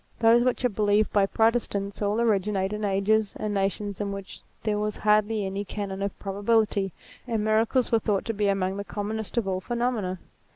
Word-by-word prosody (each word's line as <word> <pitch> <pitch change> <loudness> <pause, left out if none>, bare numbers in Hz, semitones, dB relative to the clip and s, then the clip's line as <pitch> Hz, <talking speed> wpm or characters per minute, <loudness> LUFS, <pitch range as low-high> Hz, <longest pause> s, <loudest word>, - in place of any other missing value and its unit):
Those 230 +1 +5
which 250 0 +1
are - - +4
believed 210 0 +1
by 200 -1 +4
Protestants 215 -3 0
all 205 +2 +1
originate 205 -3 +1
in 210 0 -4
ages 205 +1 +1
and 210 -1 -2
nations 200 0 -1
in 200 -1 -2
which 195 -1 -7 0.2
there 210 -2 0
was 210 0 -2
hardly 210 0 +2
any 195 +1 -3
canon 200 -1 -5
of 200 -1 -3
probability, 205 0 +1 0.4
and 225 -3 -1
miracles 225 +4 +2
were 230 - +4
thought 205 -2 0
to 225 - -2
be 205 -1 0
among 195 -1 0
the 200 - -3
commonest 215 +2 -4
of 225 -4 +1
all 185 -1 0
phenomena. 235 -5 -1
210 Hz, 190 wpm, -26 LUFS, 195-220 Hz, 0.4 s, Those